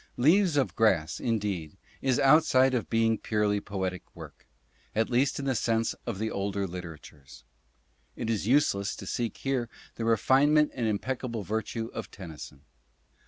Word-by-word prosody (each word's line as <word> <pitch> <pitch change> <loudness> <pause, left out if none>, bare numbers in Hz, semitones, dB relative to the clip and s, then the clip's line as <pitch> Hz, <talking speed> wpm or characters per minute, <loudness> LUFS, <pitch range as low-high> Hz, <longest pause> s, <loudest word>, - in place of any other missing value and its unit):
"Leaves 165 +5 +4
of 135 - +1
Grass," 95 -8 +2
indeed, 100 -7 -2 0.2
is 130 -2 +2
outside 135 -2 +5
of 120 - -1
being 115 0 +3
a - - -2
purely 105 -1 0
poetic 95 -3 -3
work, - - -12 0.5
at 110 +2 +1
least 125 +4 +2
in 140 - -4
the 135 - +1
sense 115 -1 0
of 115 -5 -3
the 110 +2 -2
older 100 0 -2
literatures. 80 -8 -10 0.7
It 115 - -4
is 110 -3 -1
useless 105 -7 +2
to - - -9
seek 115 +4 -3
here 130 -4 -2 0.3
the 115 - -3
refinement 140 +7 +4
and 120 -4 -1
impeccable 115 +1 -2
virtue 110 +2 -3
of - - -6
Tennyson. 80 -6 -10
115 Hz, 155 wpm, -28 LUFS, 100-130 Hz, 0.7 s, outside